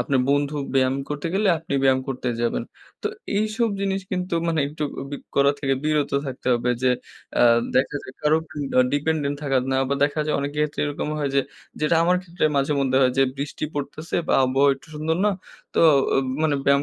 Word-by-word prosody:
আপনার 130 +1 +1
বন্ধু 145 +1 +1 0.2
ব্যায়াম 130 0 +3
করতে 150 +1 -3
গেলে 205 +1 +2
আপনি 160 -3 -5
ব্যায়াম 130 -1 +4
করতে 130 -1 -3
যাবেন। 120 - 0 0.4
তো - - -1 0.3
এইসব 215 +2 +1
জিনিস 195 0 0
কিন্তু 180 -1 -2
মানে 160 -2 +1
একটু 150 +1 -6 0.2
আব 135 - -9 0.2
করা 140 0 +5
থেকে 135 -1 +1
বিরত 150 -1 +1 0.2
থাকতে 130 -1 -7
হবে 120 +1 0
যে, 130 - +4 0.5
আ - - +6 0.3
দেখা 140 +3 +2
যায় - - -10
কারো 150 +1 +3 0.4
উন 125 - +6
ডিপেন্ডেন্ট 145 -1 0
থাকা 135 -2 +1 0.2
না - - +2
বা 140 - +1
দেখা 145 +2 -1
যায় 155 - 0
অনেকে 145 +1 -4
ক্ষেত্রে 150 -1 -1
এরকম 145 0 -3
হয় 140 -2 -1
যে, 140 - +5 0.4
যেটা 155 +2 +3
আমার 180 +2 +3
ক্ষেত্রে 175 -2 -3
মাঝে 140 +2 +2
মধ্যে 130 -1 +1
হয় 125 -1 +3
যে - - +6
বৃষ্টি 145 +2 -4
পড়তেছে 150 +3 -4
বা - - +3
আবহাওয়া 135 +2 +3
একটু 135 - -18
সুন্দর 155 +2 -1
না 210 - +4 0.4
তো - - +3 0.3
ও - - +4 0.3
মানে 155 -2 +2
ব্যায়াম 140 0 +4
145 Hz, 200 wpm, -23 LUFS, 135-155 Hz, 0.5 s, আ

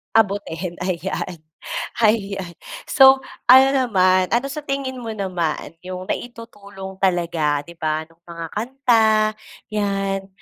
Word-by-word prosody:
abutin 195 -5 0
ayan, 185 -1 -3 0.6
ayan. 200 -5 +1 0.4
So, 265 -1 +7 0.3
ano 260 +1 +9
naman 185 -7 +3
ano 245 +4 +1
sa 300 0 -6
tingin 275 -2 -3
mo 225 - -4
naman 180 -6 -3
yung 185 0 -6
naitutulong 200 -5 -7
talaga, 170 -5 +1
'di 170 - -11
ba, 155 0 -1
nung 165 +1 -26
mga 170 -1 -7
kanta 240 0 +2 0.7
'yan 195 -2 -1
195 Hz, 115 wpm, -21 LUFS, 175-230 Hz, 0.7 s, ano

